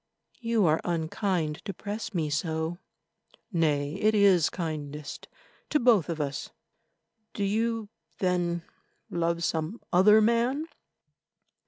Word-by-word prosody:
"You 230 -4 +2
are 155 0 +3
unkind 170 -1 -1
to 195 -4 -4
press 210 +5 -5
me 160 -6 -1
so." 160 +3 -1 0.7
"Nay, 150 -4 +1
it 215 +1 +4
is 195 -6 +5
kindest 150 -4 -5 0.4
to 300 - +2
both 225 - +4
of 165 -2 -3
us. 145 -1 -3 0.9
Do 205 - -1
you 225 +2 0 0.3
then 175 -2 0 0.5
love 170 0 0
some 160 +7 -1
other 210 +4 +7
man?" 235 +7 +2
175 Hz, 115 wpm, -28 LUFS, 160-215 Hz, 0.9 s, other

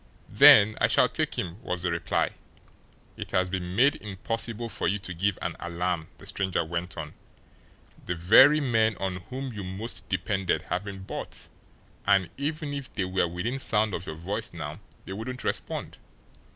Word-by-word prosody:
"Then 110 +2 +8
I - - +5
shall - - +4
take - - -2
him," 90 +5 -4
was 90 -7 -3
the 90 - 0
reply. 85 - 0 0.9
"It - - -6
has 90 -1 +1
been 90 -1 -3
made 130 +7 +4
impossible 115 +3 -4
for 115 - -2
you 100 +4 +1
to 95 -2 -6
give 95 +3 0
an - - -2
alarm," 85 -1 -2
the - - -14
stranger 95 -4 -1
went 85 +1 -4
on. 75 -2 -6 0.9
"The 90 - -1
very 120 - +7
men 110 -6 +2
on 95 -2 -2
whom 130 0 -5
you 105 -2 -5
most 95 +5 -5
depended 95 -3 0
have 90 +3 -3
been 95 -2 -7
bought, - - -7 0.6
and 95 -4 +3
even 150 +1 -3
if 140 -2 -5
they 95 - -2
were 95 -1 +1
within 95 +10 -3
sound 110 -5 +2
of 90 +2 -4
your 80 - -5
voice 100 +7 -4
now 75 0 -6 0.3
they 95 - -6
wouldn't 125 +5 -5
respond. - - -3
95 Hz, 175 wpm, -27 LUFS, 90-115 Hz, 0.9 s, Then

